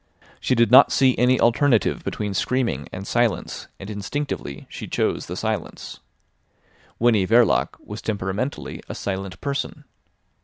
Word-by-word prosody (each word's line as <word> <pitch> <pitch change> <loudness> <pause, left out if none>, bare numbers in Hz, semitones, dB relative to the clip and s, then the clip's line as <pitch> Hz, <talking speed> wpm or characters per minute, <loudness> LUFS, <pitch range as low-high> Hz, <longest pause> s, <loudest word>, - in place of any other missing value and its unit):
She 130 - +1
did 115 0 +3
not 125 - +8
see 130 -2 +4
any 125 +1 +4
alternative 120 -2 +3
between 105 -2 -3
screaming 115 - -1
and 95 - -6
silence, 120 -1 -1
and 95 - -8
instinctively 105 - -4
she - - -8
chose - - -1
the - - -5
silence. - - -4 1.0
Winnie 110 -5 +3
Verloc 115 -1 +3
was 105 +1 -8
temperamentally 105 +5 -3
a - - -5
silent 95 -1 -4
person. 140 -1 -3
115 Hz, 130 wpm, -23 LUFS, 95-125 Hz, 1.0 s, not